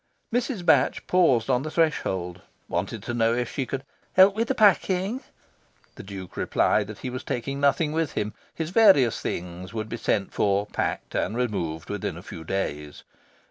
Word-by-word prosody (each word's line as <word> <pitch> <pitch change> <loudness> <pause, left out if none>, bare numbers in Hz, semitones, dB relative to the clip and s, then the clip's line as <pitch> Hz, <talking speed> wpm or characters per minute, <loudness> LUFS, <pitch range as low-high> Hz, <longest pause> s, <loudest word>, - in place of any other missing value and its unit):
Mrs. 240 -6 -1
Batch 135 -5 +3
paused 135 - +3
on 130 -2 +2
the 155 - -4
threshold, 95 - 0 0.3
wanted 95 +4 -3
to 120 - -4
know 115 0 +2
if 120 -1 -2
she 135 -4 -2
could 135 -1 -4 0.3
"help 190 +1 +7
with 230 +1 0
the - - 0
packing." 200 +3 +3 0.7
The - - -10
Duke 95 -2 -9
replied 105 -2 +1
that 105 0 -8
he 125 - -2
was 130 - -5
taking 135 +3 -3
nothing 145 +2 +2
with 160 -1 -1
him: 105 0 -2 0.2
his 160 0 -3
various 190 - +5
things 90 +3 -5
would 110 0 -3
be 120 - -4
sent 100 -3 -1
for, 100 0 +1
packed, - - -3
and 105 +6 -1
removed, 85 -10 -2
within - - -3
a - - -10
few 80 - -9
days. 75 -5 -4
120 Hz, 180 wpm, -25 LUFS, 100-165 Hz, 0.7 s, help